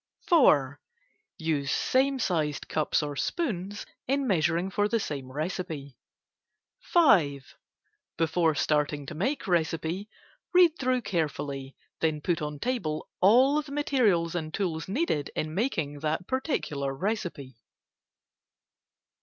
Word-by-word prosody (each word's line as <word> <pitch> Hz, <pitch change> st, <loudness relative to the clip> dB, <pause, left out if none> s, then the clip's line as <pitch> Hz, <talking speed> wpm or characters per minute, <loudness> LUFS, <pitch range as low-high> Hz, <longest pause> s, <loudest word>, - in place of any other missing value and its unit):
4. 145 Hz, -, +4 dB, 0.6 s
Use 150 Hz, -4 st, -1 dB
same 270 Hz, -, +2 dB
sized 155 Hz, -, -1 dB
cups 155 Hz, 0 st, 0 dB
or 145 Hz, -1 st, -4 dB
spoons 205 Hz, -, -2 dB, 0.2 s
in 275 Hz, +1 st, +1 dB
measuring 175 Hz, -2 st, +1 dB
for 205 Hz, +1 st, +1 dB
the 230 Hz, +2 st, +1 dB
same 140 Hz, -9 st, -5 dB
recipe. 155 Hz, -2 st, -4 dB, 0.8 s
5. 175 Hz, -, +3 dB, 0.6 s
Before 165 Hz, -1 st, +2 dB
starting 150 Hz, -1 st, 0 dB
to -, -, -7 dB
make 215 Hz, -, -2 dB
recipe, 170 Hz, +3 st, -1 dB, 0.5 s
read 355 Hz, -2 st, +7 dB
through 255 Hz, -2 st, +1 dB
carefully, 140 Hz, -6 st, -3 dB, 0.2 s
then 155 Hz, -2 st, +1 dB
put 165 Hz, +1 st, -1 dB
on 150 Hz, 0 st, -4 dB
table 165 Hz, -, -2 dB
all 260 Hz, +9 st, +5 dB
the 285 Hz, -1 st, -12 dB
materials 230 Hz, -, +2 dB
and 160 Hz, -3 st, -3 dB
tools 165 Hz, -4 st, -2 dB
needed 195 Hz, -, -1 dB
in 155 Hz, 0 st, -2 dB
making 160 Hz, -, -1 dB
that 155 Hz, +3 st, -2 dB
particular 150 Hz, -, -2 dB
recipe. 175 Hz, -, -3 dB
165 Hz, 115 wpm, -28 LUFS, 150-230 Hz, 0.8 s, read